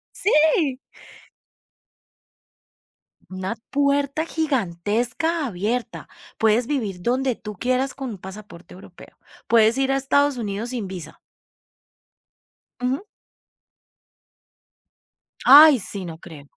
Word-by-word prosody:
Sí. 305 - +2 2.5
Una 185 +4 -4
puerta 285 +2 0
gigantesca 255 - -1
abierta. 225 +2 -3 0.3
Puedes 225 +2 +2
vivir 215 -11 -3
donde 255 +2 0
tú 210 -2 -9
quieras 255 +5 -1
con 270 -1 -6
un 200 - -8
pasaporte 190 -2 -12
europeo. 180 -1 -15 0.3
Puedes 225 +1 +4
ir 270 0 +1
a - - +1
Estados 280 0 +1
Unidos 215 +2 -4
sin 235 -5 -4
visa. 175 -5 -9 1.6
Ujú. 260 +8 -1 2.4
Ay, 295 0 +9
sí, 195 -2 -7
no 165 -2 -8
creo. 155 -6 -13
245 Hz, 95 wpm, -22 LUFS, 195-275 Hz, 2.5 s, Ay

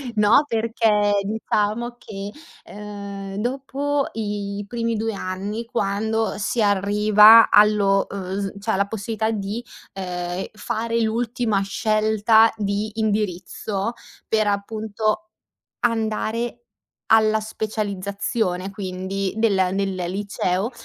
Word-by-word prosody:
No, 215 +7 +5
perché 220 -3 +2
diciamo 220 +3 -1
che, 200 -3 -7 0.3
ehm, 200 -1 -7
dopo 275 +4 -1
i 205 -2 -3
primi 230 +1 -2
2 225 +1 -2
anni, 200 +4 -4
quando 220 +1 -1
si 220 +3 -1
arriva 210 +2 +6
allo, 205 -2 +4
uhm, 190 0 -4
s 195 -1 -3
cioè, 220 +2 -1
alla 200 +1 +1
possibilità 220 +1 -2
di, 210 +2 -3 0.3
ehm, 180 -1 -4
fare 230 +2 -2
l'ultima 225 -2 0
scelta 215 +2 +3
di 205 +1 -2
indirizzo, 205 0 -2 0.3
per 215 -1 +2
appunto 215 +1 -2 0.5
andare 230 0 -1 0.5
alla 220 -1 +4
specializzazione 200 -2 -2
quindi 190 0 -3
del 200 -5 +2
nel 195 0 -1 0.2
liceo, 195 +2 -1
210 Hz, 100 wpm, -22 LUFS, 200-225 Hz, 0.5 s, arriva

